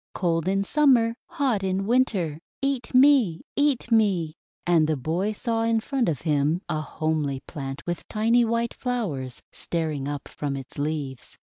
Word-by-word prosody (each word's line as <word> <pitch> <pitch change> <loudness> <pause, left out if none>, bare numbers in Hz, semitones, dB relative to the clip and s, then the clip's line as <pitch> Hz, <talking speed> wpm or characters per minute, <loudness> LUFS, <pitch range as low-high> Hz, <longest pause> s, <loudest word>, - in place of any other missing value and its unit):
Cold 170 -2 0
in 195 +1 +2
Summer, 245 -2 +4
hot 255 -8 0
in 190 0 -1
Winter! 200 - +1 0.2
Eat 270 -3 -1
me! 255 - +5
Eat 285 -5 +1
me!" 190 -8 +2 0.3
And 165 -3 +4
the 155 -1 0
boy 170 +10 -1
saw 225 +1 -1
in 225 0 +2
front 250 -2 0
of 150 -6 -2
him 155 +2 +1
a 155 - -1
homely 155 -3 -2
plant 135 -1 -7
with 175 0 -4
tiny 230 +3 +3
white 230 0 0
flowers 175 - -3
staring 155 -5 -3
up 145 -1 -4
from 145 -2 -4
its 135 +1 -9
leaves. 145 -3 -4
180 Hz, 155 wpm, -25 LUFS, 155-230 Hz, 0.3 s, me